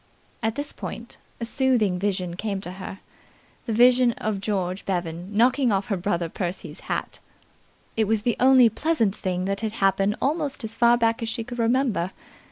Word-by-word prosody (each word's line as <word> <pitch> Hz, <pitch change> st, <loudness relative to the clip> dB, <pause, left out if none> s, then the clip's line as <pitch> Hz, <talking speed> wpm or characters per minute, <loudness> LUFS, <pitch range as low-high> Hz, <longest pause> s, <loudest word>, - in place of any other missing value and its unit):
At 225 Hz, -1 st, -1 dB
this 285 Hz, 0 st, -4 dB
point -, -, -7 dB, 0.2 s
a 230 Hz, -, -2 dB
soothing 235 Hz, -7 st, +2 dB
vision 185 Hz, -3 st, -1 dB
came 200 Hz, 0 st, -3 dB
to 180 Hz, -, -6 dB
her 190 Hz, +1 st, -8 dB, 0.7 s
the -, -, -1 dB
vision 245 Hz, +1 st, +5 dB
of 210 Hz, -3 st, -3 dB
George 190 Hz, -2 st, -2 dB
Bevan 175 Hz, +1 st, -3 dB
knocking 250 Hz, +1 st, +4 dB
off 200 Hz, +3 st, 0 dB
her 200 Hz, -, +1 dB
brother 175 Hz, -2 st, -1 dB
Percy's 180 Hz, +2 st, -5 dB
hat. -, -, -4 dB, 0.8 s
It 220 Hz, -, +2 dB
was 215 Hz, 0 st, +1 dB
the 240 Hz, -1 st, +1 dB
only 255 Hz, -1 st, +7 dB
pleasant 225 Hz, -4 st, 0 dB
thing 185 Hz, -1 st, -2 dB
that 195 Hz, +1 st, -2 dB
had 220 Hz, -1 st, -2 dB
happened 195 Hz, -1 st, +2 dB
almost 285 Hz, -2 st, -1 dB
as 220 Hz, 0 st, -3 dB
far 240 Hz, 0 st, +5 dB
back 230 Hz, -1 st, +1 dB
as 230 Hz, -, -2 dB
she 230 Hz, 0 st, -3 dB
could 240 Hz, +1 st, -8 dB
remember. 230 Hz, -6 st, +1 dB
215 Hz, 175 wpm, -24 LUFS, 195-240 Hz, 0.8 s, only